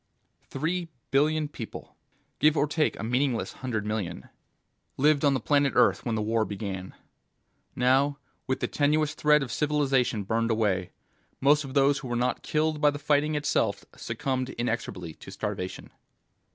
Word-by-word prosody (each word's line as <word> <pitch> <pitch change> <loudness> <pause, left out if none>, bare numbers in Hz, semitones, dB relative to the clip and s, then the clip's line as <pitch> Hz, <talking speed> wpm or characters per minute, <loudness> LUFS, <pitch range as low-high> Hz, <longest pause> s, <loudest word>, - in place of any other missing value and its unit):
Three 170 +5 -2 0.2
billion 150 +2 +2
people 120 -6 -9 0.4
(give 155 +1 +4
or 145 - +3
take 150 +1 0
a - - -4
meaningless 125 +1 0
hundred 115 -5 -2
million) 95 -10 -4 0.7
lived 145 +1 +3
on 140 -2 +4
the - - 0
planet 140 +3 +2
Earth - - +4
when 115 -2 -1
the 110 - -1
war 110 +1 +1
began. 100 -3 -5 0.8
Now, 135 +3 +3 0.3
with 130 0 -1
the - - +1
tenuous 150 +1 +1
thread 150 -1 +3
of 125 - -6
civilization 135 -6 +1
burned 115 +3 0
away, 105 -5 +1 0.5
most 145 +2 +4
of 135 -1 -8
those 140 0 +4
who 135 - -7
were 120 - -2
not 125 +1 0
killed 155 0 0
by 150 - +6
the 145 - -3
fighting 150 +1 +1
itself 150 0 0
succumbed 130 -1 -3
inexorably 110 -9 -3
to - - -13
starvation. 90 0 -5
135 Hz, 155 wpm, -27 LUFS, 115-150 Hz, 0.8 s, by